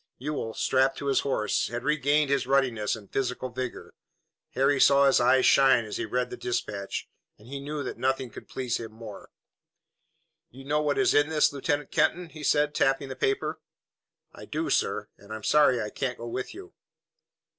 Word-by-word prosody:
Ewell, 135 -5 -4
strapped 135 +1 +2
to - - -6
his 140 -1 +2
horse, 110 -6 0
had 120 0 -5
regained 150 0 +2
his 140 -2 +1
ruddiness 130 -6 +1
and 105 -3 -14
physical 130 -1 -2
vigor. 125 0 -6 0.6
Harry 135 +1 +2
saw 140 0 +6
his 135 -2 +4
eyes 130 +2 +4
shine 130 -4 +5
as 105 - -5
he - - -2
read 125 0 -1
the - - -6
dispatch, 100 -5 -4 0.3
and 105 - -18
he 140 +2 -6
knew 145 +1 -5
that 125 - -6
nothing 130 -1 -1
could - - -11
please 125 -3 -2
him 115 -1 -8
more. 110 -2 -11 1.2
"You 135 +3 -13
know 150 +2 +1
what 145 -1 0
is 195 - +3
in 145 +1 +3
this, 150 -2 +2
Lieutenant 145 +1 -2
Kenton?" 175 -1 +1
he 155 -1 -11
said, 150 0 +2
tapping 135 0 +1
the 130 - -6
paper. 135 - -1 0.7
"I - - -11
do, - - -3
sir, - - 0
and 100 +1 -15
I'm 110 -1 -6
sorry 145 -3 +4
I 105 -2 -4
can't 130 -2 -3
go 115 - -8
with 125 - -5
you." 380 0 -11
135 Hz, 190 wpm, -27 LUFS, 120-145 Hz, 1.2 s, saw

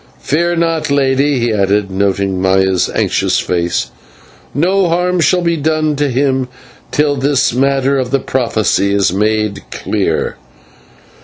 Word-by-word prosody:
Fear 170 +4 0
not, 165 -2 0
lady," 140 0 +2
he 120 -2 0
added, 100 0 0
noting 95 -1 -1
Maya's 95 -1 +2
anxious - - +1
face, 85 -1 -1 0.6
"no 180 +4 +1
harm 180 +1 0
shall 180 +2 +2
be 170 -1 +1
done 155 0 0
to 145 0 0
him 130 0 0 0.4
till 145 -1 +1
this 140 -2 +1
matter 135 +1 +1
of 125 -2 -2
the 140 - +2
prophecy 110 -6 0
is 100 -3 +1
made 105 0 0
clear." - - -2
135 Hz, 135 wpm, -14 LUFS, 100-150 Hz, 0.6 s, lady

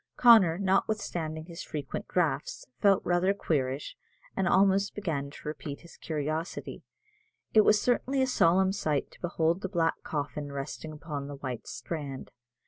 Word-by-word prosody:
Connor, 220 -9 +7
notwithstanding 185 -5 -1
his 170 0 -8
frequent 145 -3 -5
draughts, 150 -6 -1
felt 200 -2 +4
rather 180 +3 +2
queerish, 140 -7 -1 0.4
and 190 -1 +1
almost 195 +1 +3
began 155 -9 -2
to 145 - -11
repent 150 -1 -5
his 170 - -15
curiosity. 155 +2 -4 0.7
It 215 - +8
was 210 0 +5
certainly 255 +3 +1
a - - +3
solemn 190 -6 +3
sight 155 -8 -1
to - - -19
behold 170 0 0
the 190 - -3
black 165 -3 0
coffin 145 -1 -4
resting 140 +3 -5
upon 150 -2 -6
the 145 - -6
white 130 -4 -6
strand. 145 -5 -6
165 Hz, 145 wpm, -29 LUFS, 145-190 Hz, 0.7 s, It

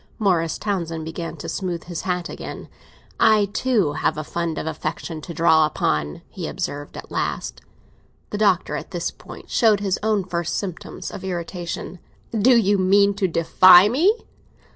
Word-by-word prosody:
Morris 175 -7 +1
Townsend 170 -6 -3
began 165 +1 -6
to - - -7
smooth 180 -4 -3
his 175 -2 -5
hat 180 -1 -1
again. - - -8 0.5
"I 215 -2 +5
too 215 - +1
have 155 - 0
a 155 - -3
fund 170 +1 -3
of - - -3
affection 160 0 -4
to 170 - -8
draw 160 -1 +4
upon!" 75 - -2
he - - -6
observed 145 0 -5
at - - -10
last. - - -3 0.7
The 210 - -3
Doctor 185 -7 +2
at 150 - -6
this 175 -3 -3
point - - -13
showed 220 -4 +4
his 195 -2 -1
own 215 -2 +1
first 175 -2 -3
symptoms 185 -5 -6
of 190 - -8
irritation. 175 -1 -5 0.3
"Do 235 +3 +4
you 205 -3 +3
mean 200 +2 +4
to 195 -1 0
defy 180 +3 +6
me?" 315 - +4
180 Hz, 165 wpm, -22 LUFS, 165-205 Hz, 0.7 s, defy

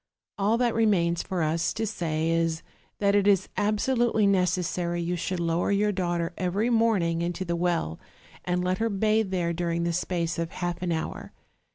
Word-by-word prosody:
All 210 +4 +2
that 240 -1 +1
re 225 0 +3
mains 170 -4 +2
for 180 -3 -2
us 160 +2 0
to 225 - -2
say 165 -6 -1
is, 165 -1 0 0.3
that 200 -1 +2
it 205 0 +3
is 195 -2 +3
absolutely 220 +1 +1
necessary 180 -2 +1
you 170 +1 -1
should 180 +1 -3
lower 170 +2 0
your 205 +1 +2
daughter 175 -3 -1
every 200 +6 0
morning 205 -8 +2
into 175 +2 -2
the 170 -1 -1
well, 170 - -1 0.4
and 180 0 -1
let 185 +1 0
her 225 0 +1
bathe 215 +1 +1
there 175 -3 -1
during 170 0 -1
the 170 0 0
space 170 -1 -1
of 165 0 -2
half 175 -1 -3
an 180 -1 -1
hour. 160 -1 -4
180 Hz, 185 wpm, -27 LUFS, 170-205 Hz, 0.4 s, re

